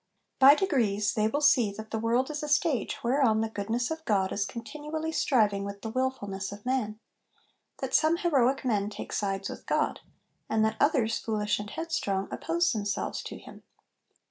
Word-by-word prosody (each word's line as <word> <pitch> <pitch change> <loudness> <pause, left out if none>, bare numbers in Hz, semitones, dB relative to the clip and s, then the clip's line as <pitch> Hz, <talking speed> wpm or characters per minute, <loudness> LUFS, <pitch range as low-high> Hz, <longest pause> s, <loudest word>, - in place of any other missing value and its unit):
By 275 +2 +9
degrees, 230 - +1
they 215 0 +2
will 290 +7 -1
see 245 -7 +4
that 220 +1 -9
the 220 - -1
world 240 +5 +1
is 295 - -4
a 300 - -4
stage 290 - 0
whereon 240 -3 +3
the 225 - -1
goodness 225 +5 -2
of 320 0 -4
God 195 -7 +1
is 200 -1 -1
continually 300 +7 -5
striving 210 -10 +2
with 200 0 -7
the 225 - -4
wilfulness 205 -7 -2
of 205 +2 -10
man; 235 -5 -1 0.8
that - - -3
some 320 +2 +4
heroic 270 -7 +2
men 210 -4 +1
take 205 - -7
sides 195 -1 -1
with - - -9
God; - - 0 0.5
and 220 0 +2
that 220 0 -1
others, 260 -7 +2
foolish 210 -2 -1
and 205 0 -6
headstrong, 200 -13 -2
oppose 340 +1 0
themselves 205 -2 -2
to - - -7
Him. - - -13
225 Hz, 175 wpm, -28 LUFS, 205-285 Hz, 0.8 s, By